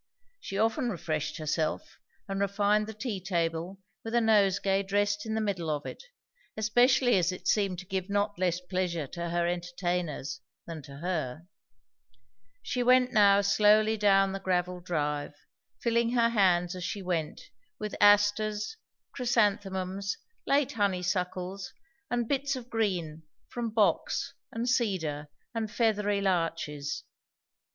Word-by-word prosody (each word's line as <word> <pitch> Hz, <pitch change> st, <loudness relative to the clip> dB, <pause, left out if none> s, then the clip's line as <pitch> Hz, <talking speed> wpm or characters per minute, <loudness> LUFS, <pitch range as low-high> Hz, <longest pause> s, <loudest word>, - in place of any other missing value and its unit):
She 195 Hz, -, -5 dB
often 225 Hz, +4 st, +1 dB
refreshed 160 Hz, -6 st, -3 dB
herself 155 Hz, 0 st, -2 dB, 0.3 s
and 195 Hz, -1 st, -3 dB
refined 205 Hz, +2 st, +2 dB
the 220 Hz, -, -6 dB
tea 215 Hz, -3 st, -4 dB
table 170 Hz, 0 st, -2 dB, 0.2 s
with 225 Hz, +1 st, -4 dB
a -, -, +6 dB
nosegay 200 Hz, -3 st, +3 dB
dressed 205 Hz, +2 st, 0 dB
in 220 Hz, -, -2 dB
the 220 Hz, -, 0 dB
middle 185 Hz, -6 st, -2 dB
of 150 Hz, 0 st, -2 dB
it, -, -, -7 dB, 0.6 s
especially 245 Hz, +2 st, +4 dB
as 180 Hz, 0 st, +2 dB
it 185 Hz, -, -7 dB
seemed 195 Hz, -4 st, +2 dB
to 180 Hz, -, -8 dB
give 190 Hz, 0 st, -3 dB
not 205 Hz, -1 st, 0 dB
less 180 Hz, -2 st, +1 dB
pleasure 180 Hz, -3 st, -2 dB
to 170 Hz, +5 st, -5 dB
her 170 Hz, 0 st, 0 dB
entertainers 175 Hz, -4 st, -3 dB, 0.2 s
than 165 Hz, -2 st, -7 dB
to 140 Hz, -1 st, -11 dB
her. 160 Hz, -3 st, -3 dB, 1.2 s
She 250 Hz, -, -2 dB
went 250 Hz, +1 st, +4 dB
now 200 Hz, -2 st, +6 dB
slowly 210 Hz, +2 st, +4 dB
down 195 Hz, -2 st, +4 dB
the 195 Hz, -, -4 dB
gravelled 180 Hz, -1 st, -1 dB
drive, 150 Hz, -4 st, -2 dB, 0.5 s
filling 235 Hz, 0 st, +2 dB
her 235 Hz, -1 st, +4 dB
hands 185 Hz, -5 st, +2 dB
as 180 Hz, -, -6 dB
she 200 Hz, +2 st, -4 dB
went 165 Hz, -4 st, -2 dB, 0.4 s
with 210 Hz, -1 st, -5 dB
asters, 205 Hz, -, +3 dB, 0.3 s
chrysanthemums, 200 Hz, -5 st, 0 dB, 0.3 s
late 280 Hz, -1 st, +2 dB
honeysuckles, 185 Hz, -3 st, -2 dB, 0.4 s
and 240 Hz, -1 st, 0 dB
bits 280 Hz, +1 st, 0 dB
of 245 Hz, -2 st, -9 dB
green 180 Hz, -8 st, -1 dB, 0.3 s
from 240 Hz, -1 st, -3 dB
box 215 Hz, -2 st, +1 dB, 0.2 s
and 230 Hz, +2 st, -3 dB
cedar 185 Hz, -, 0 dB, 0.3 s
and 225 Hz, -2 st, -2 dB
feathery 210 Hz, -3 st, +1 dB
larches. 165 Hz, -6 st, -1 dB
195 Hz, 135 wpm, -29 LUFS, 175-215 Hz, 1.2 s, a